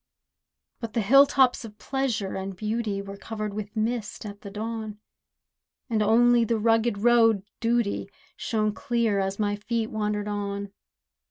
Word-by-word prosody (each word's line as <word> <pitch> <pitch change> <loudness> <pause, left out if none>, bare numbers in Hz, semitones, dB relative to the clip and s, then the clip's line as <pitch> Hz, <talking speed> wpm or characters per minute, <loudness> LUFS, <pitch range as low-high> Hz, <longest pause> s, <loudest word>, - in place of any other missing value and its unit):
But 230 -2 -6
the 230 - +1
hill 275 +7 +7
tops 260 -3 +3
of 210 -2 -10
pleasure 260 -8 -2
and 190 0 -5
beauty 215 0 -2
Were 200 0 -8
covered 215 -1 -5
with 210 +1 -6
mist 220 -1 -2
at 205 -1 -8
the 200 - -8
dawn; 215 0 -5 0.9
And 220 -1 +2
only 235 +3 +5
the 230 0 0
rugged 225 0 +2
road 225 -2 +4 0.2
Duty 235 -2 0 0.3
Shone 215 -2 -1
clear, 235 -5 0
as 195 0 -1
my 205 -1 0
feet 225 +2 -2
wandered 210 -1 -2
on. 200 -1 -3
215 Hz, 150 wpm, -26 LUFS, 205-235 Hz, 0.9 s, hill